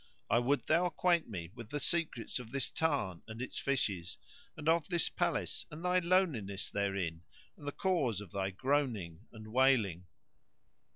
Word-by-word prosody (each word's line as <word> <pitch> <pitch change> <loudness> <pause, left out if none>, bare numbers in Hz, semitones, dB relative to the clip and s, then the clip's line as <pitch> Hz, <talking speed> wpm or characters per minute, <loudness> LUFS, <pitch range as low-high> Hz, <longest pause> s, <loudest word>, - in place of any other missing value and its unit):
I 120 - +6
would 135 +4 +1
thou 180 +1 +4
acquaint 175 -3 +2
me 85 -5 -5
with 115 -2 -9
the 145 - -2
secrets 155 -7 -1
of 120 -3 -8
this 135 +1 -2
tarn 140 - 0
and 110 0 -7
its 125 - -4
fishes 100 -11 -1 0.4
and 150 - -5
of 165 -1 +4
this 170 -4 +2
palace - - -1
and 160 +4 -8
thy 180 0 +4
loneliness 165 - +1
therein 95 -5 -1 0.3
and 145 - -11
the - - 0
cause 145 - +1
of 105 -4 -9
thy 95 -1 -1
groaning 110 - -1
and 110 -1 -10
wailing." 115 -10 +3
125 Hz, 165 wpm, -34 LUFS, 100-155 Hz, 0.4 s, I